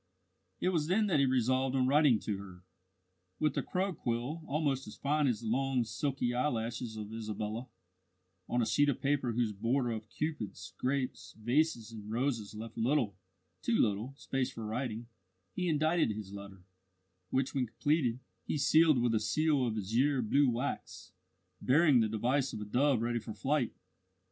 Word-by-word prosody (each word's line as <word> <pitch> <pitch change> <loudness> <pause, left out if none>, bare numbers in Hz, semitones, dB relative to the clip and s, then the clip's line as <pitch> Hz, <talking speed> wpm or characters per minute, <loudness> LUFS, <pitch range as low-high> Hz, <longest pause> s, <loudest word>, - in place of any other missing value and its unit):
It 185 - +1
was 160 -5 0
then 205 +5 +3
that 175 -8 +2
he 140 - +4
resolved 130 +1 +2
on 130 -1 +3
writing 140 -4 +5
to 100 -3 -3
her. 95 -2 -11 0.7
With 150 +3 +1
a - - +1
crow 190 +1 -1
quill 125 +2 -3
almost 140 -3 0
as 105 - -9
fine 145 +1 +1
as 120 -3 0
the 115 - -5
long 130 +2 +1
silky 125 +1 -1
eyelashes 120 -3 -2
of 105 0 -6
Isabella, 110 +2 -4 0.8
on 120 0 +2
a - - +1
sheet 145 +5 +3
of 140 - -1
paper 140 -4 0
whose 115 -2 0
border 120 +5 0
of 110 -1 -5
Cupids, 105 -12 -4
grapes, 130 0 -2
vases, 120 0 +1
and 105 -2 -9
roses 115 -4 -1
left 115 +1 -7
little 120 -4 +1 0.5
too 235 -2 +1
little 110 +5 0
space 135 -2 -2
for 115 - -7
writing, 115 0 -3 0.5
he 180 -1 -1
indited 155 +1 +2
his 105 -2 -5
letter, 100 -2 -9 0.7
which, 130 0 0
when 130 -3 0
completed, 130 0 +1 0.3
he - - 0
sealed 155 0 +5
with 120 -1 +2
a 110 - +3
seal 140 +4 +2
of 110 -1 -2
azure 125 +7 +1
blue 140 +5 +3
wax, 125 +4 -4 0.5
bearing 145 -1 +5
the 110 -1 +2
device 125 +5 0
of - - -4
a - - -4
dove 125 +2 +2
ready 120 0 0
for 110 -1 -8
flight. 135 -3 0
125 Hz, 170 wpm, -32 LUFS, 110-145 Hz, 0.8 s, writing